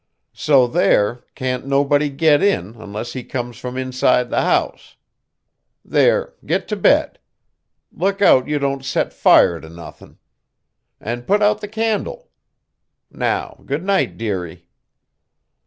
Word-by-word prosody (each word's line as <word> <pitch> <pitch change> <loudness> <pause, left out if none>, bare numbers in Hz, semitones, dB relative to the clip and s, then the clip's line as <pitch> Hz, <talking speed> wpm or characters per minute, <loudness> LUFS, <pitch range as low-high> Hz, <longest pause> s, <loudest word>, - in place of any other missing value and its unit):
So 135 -4 +3
there, 120 -1 +1
can't 130 0 -3
nobody 145 +1 +2
git 145 +1 +3
in 195 - 0
unless 110 +1 -7
he 130 - -6
comes 120 -1 -6
from 125 0 -6
inside 130 -1 +1
the - - +1
house. - - -1 0.9
There, - - +2
git - - -2
to - - -1
bed. - - +2 0.7
Look 195 +3 -1
out 130 -10 +5
you 150 0 0
don't 140 -1 -2
set 130 - -2
fire 85 -1 +4
to 80 - -12
nothing. 85 +1 -13 0.8
And 120 +2 -6
put 205 +1 +2
out 210 +1 +2
the 210 - -5
candle. 225 - -3 0.8
Now - - -3
good 140 +5 -2
night, 195 0 0
dearie." 90 -6 -5
130 Hz, 130 wpm, -19 LUFS, 120-160 Hz, 0.9 s, out